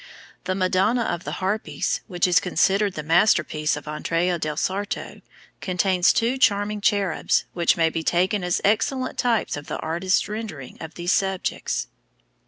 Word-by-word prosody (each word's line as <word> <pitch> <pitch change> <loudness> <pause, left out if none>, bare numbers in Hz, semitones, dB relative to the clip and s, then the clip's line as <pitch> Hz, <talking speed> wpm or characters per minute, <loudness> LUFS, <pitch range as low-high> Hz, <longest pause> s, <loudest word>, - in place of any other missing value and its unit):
The 185 0 -1
Madonna 195 +6 +2
of 175 -5 -3
the - - -4
Harpies, 200 +3 -2
which 180 -4 0
is 180 -1 +4
considered 195 +3 +1
the 155 - -4
masterpiece 160 -2 +2
of 150 0 -9
Andrea 165 +3 -1
del 155 -2 -3
Sarto, 200 +4 -3 0.4
contains 185 -1 +2
two 240 +3 0
charming 205 -2 +2
cherubs, 200 -5 +1
which 170 -1 +2
may 165 -1 +2
be 165 - -2
taken 180 +4 +1
as 180 0 0
excellent 255 +5 0
types 235 -3 +1
of 145 0 -8
the - - -3
artist's 175 +4 0
rendering 210 - -7
of 160 -1 -8
these 175 +1 -1
subjects. 190 - -1
185 Hz, 155 wpm, -23 LUFS, 165-205 Hz, 0.4 s, is